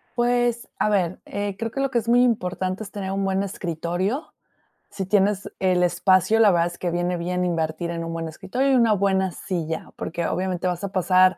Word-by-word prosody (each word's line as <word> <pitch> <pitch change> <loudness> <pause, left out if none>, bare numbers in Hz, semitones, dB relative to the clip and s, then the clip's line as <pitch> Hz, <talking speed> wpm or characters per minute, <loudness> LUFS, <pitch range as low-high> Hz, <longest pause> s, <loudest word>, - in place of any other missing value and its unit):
Pues 240 -1 +1
a - - +2
ver, 185 -4 0
eh, 200 -1 -4
creo 230 +1 -2
que 275 - -4
lo 275 -1 +1
que 240 - +1
es 230 - -4
muy 245 +1 +5
importante 190 -4 0
es 205 - -8
tener 195 -2 -4
un 195 0 -1
buen 195 0 +1
escritorio, 185 - -3 0.6
si 190 - -4
tienes 200 +1 +1
el 180 -1 +2
espacio, 185 +4 +3
la 215 -3 +7
verdad 170 -1 +3
es 175 - -8
que 175 - -2
viene 175 +1 0
bien 180 +1 -1
invertir 165 0 -1
en 170 -1 -3
un 165 0 -4
buen 165 -1 -3
escritorio 225 - -1
y - - +5
una 230 -3 +4
buena 190 -1 +1
silla, 165 -4 -4
porque 170 +1 -3
obviamente 185 -1 -1
vas 180 +1 -2
a 200 - -3
pasar 185 -1 +4
190 Hz, 210 wpm, -24 LUFS, 175-210 Hz, 0.6 s, la